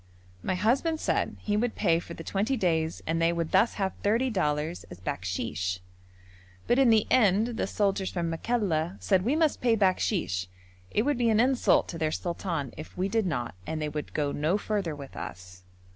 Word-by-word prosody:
My 185 Hz, -, -1 dB
husband 265 Hz, -, +1 dB
said -, -, 0 dB
he 205 Hz, -, 0 dB
would 225 Hz, +2 st, 0 dB
pay 170 Hz, -5 st, +2 dB
for 170 Hz, 0 st, -9 dB
the 165 Hz, -, -8 dB
twenty 210 Hz, +10 st, 0 dB
days 165 Hz, -5 st, 0 dB
and 165 Hz, +1 st, 0 dB
they 165 Hz, 0 st, +4 dB
would 170 Hz, -1 st, -2 dB
thus 200 Hz, +5 st, +3 dB
have 195 Hz, -2 st, -1 dB
thirty 235 Hz, +5 st, +2 dB
dollars 155 Hz, -3 st, -1 dB
as 90 Hz, -, -12 dB
bakshish. 90 Hz, 0 st, -3 dB, 0.9 s
But, 245 Hz, -, +3 dB
in 265 Hz, -3 st, +6 dB
the 220 Hz, -2 st, +5 dB
end, 215 Hz, -1 st, +4 dB
the 225 Hz, -5 st, -2 dB
soldiers 195 Hz, -2 st, 0 dB
from 175 Hz, -2 st, -2 dB
Makalla 175 Hz, -3 st, -1 dB
said 190 Hz, -3 st, +2 dB
we 255 Hz, +8 st, +1 dB
must 315 Hz, -2 st, +2 dB
pay 235 Hz, -2 st, +3 dB
bakshish: 185 Hz, -, +1 dB, 0.4 s
it 215 Hz, -, +1 dB
would 285 Hz, -1 st, 0 dB
be 235 Hz, -1 st, +3 dB
an 220 Hz, -1 st, +3 dB
insult 255 Hz, +1 st, +3 dB
to 165 Hz, -, -5 dB
their 155 Hz, -1 st, +1 dB
sultan 170 Hz, -5 st, -3 dB
if 155 Hz, -, -9 dB
we 185 Hz, +2 st, 0 dB
did 220 Hz, -1 st, +1 dB
not 125 Hz, -8 st, -2 dB
and 160 Hz, -, -2 dB
they 150 Hz, -1 st, -2 dB
would 150 Hz, 0 st, -6 dB
go 145 Hz, -2 st, 0 dB
no 155 Hz, +8 st, +1 dB
further 205 Hz, -7 st, -2 dB
with 140 Hz, -2 st, -10 dB
us. 90 Hz, 0 st, -8 dB
185 Hz, 195 wpm, -28 LUFS, 155-220 Hz, 0.9 s, in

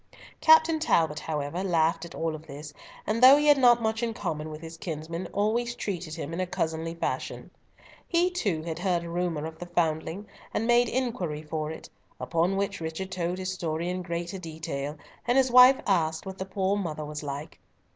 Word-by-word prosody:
Captain 320 Hz, 0 st, +6 dB
Talbot, 160 Hz, -, +2 dB
however, 150 Hz, +3 st, -3 dB
laughed 170 Hz, -2 st, +1 dB
at 170 Hz, -, -10 dB
all 165 Hz, -1 st, -2 dB
this, 150 Hz, -1 st, -10 dB, 0.3 s
and, 220 Hz, +2 st, -1 dB
though 265 Hz, +3 st, +10 dB
he 295 Hz, -, +1 dB
had 290 Hz, -2 st, +6 dB
not 240 Hz, -2 st, +5 dB
much 220 Hz, +1 st, 0 dB
in 230 Hz, -2 st, -2 dB
common 155 Hz, -6 st, -3 dB
with 155 Hz, 0 st, -7 dB
his 165 Hz, 0 st, -9 dB
kinsman, 165 Hz, +1 st, -5 dB
always 235 Hz, +4 st, 0 dB
treated 175 Hz, -8 st, -4 dB
him 160 Hz, -, -5 dB
in 170 Hz, -, -3 dB
a 185 Hz, -, -1 dB
cousinly 165 Hz, -1 st, -2 dB
fashion. 170 Hz, -, -4 dB, 0.6 s
He 350 Hz, +1 st, +2 dB
too 200 Hz, -, -1 dB
had 165 Hz, 0 st, -4 dB
heard 180 Hz, -2 st, 0 dB
a 170 Hz, -, -7 dB
rumour 170 Hz, -3 st, -1 dB
of 160 Hz, 0 st, -8 dB
the 175 Hz, -, -7 dB
foundling, 165 Hz, +3 st, -1 dB, 0.3 s
and 225 Hz, -, 0 dB
made 240 Hz, +1 st, +4 dB
inquiry 210 Hz, -12 st, -2 dB
for 155 Hz, 0 st, -3 dB
it, 160 Hz, -, -8 dB, 0.3 s
upon 170 Hz, +3 st, 0 dB
which 200 Hz, -2 st, -2 dB
Richard 160 Hz, +4 st, -4 dB
told 175 Hz, 0 st, -2 dB
his 185 Hz, 0 st, -3 dB
story 170 Hz, -1 st, -2 dB
in 180 Hz, 0 st, -2 dB
greater 175 Hz, +1 st, -4 dB
detail, 155 Hz, -3 st, -5 dB, 0.3 s
and 245 Hz, +2 st, +3 dB
his 260 Hz, -2 st, +3 dB
wife 250 Hz, +2 st, +8 dB
asked 160 Hz, -4 st, +1 dB
what 190 Hz, 0 st, -7 dB
the 190 Hz, -, -3 dB
poor 190 Hz, +1 st, 0 dB
mother 155 Hz, -6 st, -3 dB
was 150 Hz, 0 st, -6 dB
like. 145 Hz, +2 st, -6 dB
175 Hz, 195 wpm, -27 LUFS, 160-210 Hz, 0.6 s, though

